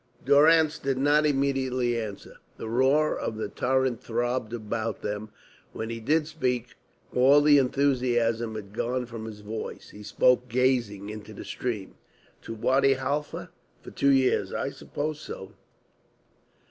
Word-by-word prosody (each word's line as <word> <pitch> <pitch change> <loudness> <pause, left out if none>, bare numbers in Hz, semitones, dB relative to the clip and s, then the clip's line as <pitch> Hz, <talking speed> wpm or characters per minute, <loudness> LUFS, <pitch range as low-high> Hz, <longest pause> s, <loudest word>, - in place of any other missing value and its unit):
Durrance 155 +3 +5
did 135 -3 -1
not 145 +3 +3
immediately 135 -3 0
answer. 110 -4 -6 0.2
The - - -6
roar 135 +6 +3
of 110 - -4
the 110 - -3
torrent 130 -1 0
throbbed 120 0 -2
about 115 -1 -4
them. 105 +1 -4 0.4
When 110 +1 -4
he 115 - -4
did 150 +7 +1
speak, 125 -7 -2 0.4
all 135 +3 +6
the 145 -1 +6
enthusiasm 125 -4 +1
had 100 -2 -8
gone 125 +3 -1
from 115 -2 -8
his 105 -2 -8
voice. 110 +2 -6
He 105 - -12
spoke 125 +4 +2
gazing 120 -5 0
into 105 0 -9
the - - -8
stream. 110 -6 -4 0.4
"To 115 - -7
Wadi 135 +4 +3
Halfa. 145 +3 -3 0.3
For - - -10
two 140 - +1
years. 135 -2 +3
I - - -2
suppose 150 +1 -4
so." 95 -8 -8
125 Hz, 145 wpm, -27 LUFS, 110-140 Hz, 0.4 s, all